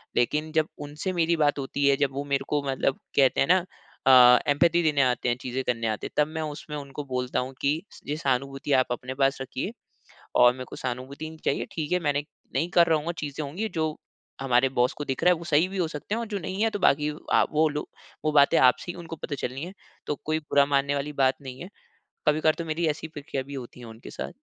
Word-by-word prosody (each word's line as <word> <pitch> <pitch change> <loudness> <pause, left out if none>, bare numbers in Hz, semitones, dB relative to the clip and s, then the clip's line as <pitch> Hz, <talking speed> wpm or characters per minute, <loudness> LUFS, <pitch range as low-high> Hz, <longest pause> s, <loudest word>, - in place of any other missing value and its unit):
लेकिन 150 +6 +1
जब 155 -1 +2 0.2
उनसे 150 +6 -4
मेरी 170 -1 +2
बात 145 -1 +2
होती 140 +1 -2
है 140 - +5
जब 140 -1 +1
वो 140 +1 -3
मेरे 140 -1 -1
को 145 - +1
मतलब 135 0 0 0.2
कहते 135 -2 +4
है - - +3
ना। 180 - +6 0.5
अ, 125 -1 +9
एम्पैथी 170 +4 +3
देने 150 -3 +3
आते 125 -1 +1
हैं 120 - +2
चीज़ें 130 +1 -3
करने 115 -3 -1
आते 110 -1 -2
है 150 - +1
तब - - -4
मैं 160 - -2
उसमें 150 -1 -6
उनको 140 0 -6
बोलता 125 -1 -2
हूँ 130 +1 -4
कि 150 +4 +1 0.3
ये 150 +2 -2
सहानुभूति 135 0 -2
आप 130 - 0
अपने 125 +2 -4
पास 135 0 +3
रखिए 130 - -4 0.7
और 125 0 +7
मेरे 130 +1 -7
को - - -9
सहानुभूति 130 +5 -5
नहीं 160 0 -11
चाहिए। - - 0
ठीक 155 0 -3
है 180 - +4
मैंने 145 -3 0 0.3
नहीं 160 +6 +1
कर 170 -1 +5
रहा 160 -1 +3
हूँगा, 165 +3 -3
चीज़ें 150 -2 -5
होंगी 180 +11 -3
जो 155 -3 -2 0.5
हमारे 130 -1 +3
बॉस 125 -1 +1
को 145 - -3
दिख 135 -2 -3
रहा 180 - +7
है 175 - -1
वो 170 - -9
सही 165 +2 +3
भी 195 - -5
हो 175 -3 +1
सकते 155 +6 -4
हैं 230 - -2
और 235 - -3
जो 205 -2 -2
नहीं 190 +3 -3
है 225 - +3
तो 205 - -3
बाकी 150 -5 +3 0.2
अ, - - +6
वो 155 +1 +3
लोग 150 0 -4 0.4
वो 155 - +1
बातें 140 -1 +5
आपसे 130 +7 +3
ही - - -13
उनको 165 -1 -7
पता 150 - -5
चलनी 130 +4 -6
है। 180 - -8 0.3
तो 150 - -1
कोई 155 0 0
बुरा 145 -2 +2
मानने 140 0 +1
वाली 145 +1 -2
बात 130 0 +3
नहीं 130 -1 -8
है। 180 - -8 0.6
कभी-कभार 155 +1 +4
तो 170 - -3
मेरी 165 +1 -1
ऐसी 155 +1 -2
प्रक्रिया 145 -3 -5
भी 140 - -10
होती 125 -2 -8
है 120 - -9
उनके 110 +1 -11
साथ। - - -5
145 Hz, 245 wpm, -26 LUFS, 135-160 Hz, 0.7 s, अ